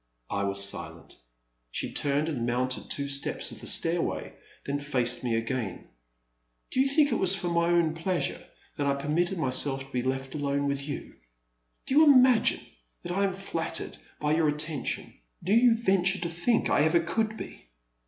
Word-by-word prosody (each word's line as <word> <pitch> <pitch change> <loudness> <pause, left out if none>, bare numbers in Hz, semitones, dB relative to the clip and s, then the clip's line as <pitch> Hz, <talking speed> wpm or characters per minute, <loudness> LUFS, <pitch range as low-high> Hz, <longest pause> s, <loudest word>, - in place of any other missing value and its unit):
*' - - -45
I - - 0
was 100 0 +1
silent. 85 -3 -7 0.5
She - - -4
turned 145 +2 0
and 140 -8 -2
mounted 125 +1 -1
two 140 0 -2
steps 140 0 -1
of - - -10
the - - -6
stairway, 170 +1 0 0.3
then 140 +1 -2
faced 125 -4 0
me 120 -2 0
again. 115 -4 -3 0.8
Do - - -1
you 270 - +3
think 290 +1 +3
it - - +1
was 190 +1 +3
for 175 -2 -3
my 170 0 +2
own 170 -2 +2
pleasure 170 +2 -2 0.3
that 145 - 0
I 140 - +2
permitted 160 +7 -1
myself 135 -2 +1
to 135 - -19
be 125 - -1
left 130 +1 -3
alone 140 -1 -1
with 140 0 -2
you? 145 - -6 0.7
Do - - -3
you 310 +3 +7
imagine 255 -5 +5 0.4
that - - -5
I 195 +3 +1
am 190 -2 -2
flattered 180 -4 -4 0.2
by 150 0 +1
your 160 0 +3
attention 150 - -3
— - - -27
do 190 - +1
you 235 0 +6
venture 190 -4 +2
to 170 -2 -3
think 175 +8 +1
I - - +3
ever 160 +3 +3
could 220 +6 -1
be - - -9
155 Hz, 185 wpm, -28 LUFS, 135-185 Hz, 0.8 s, you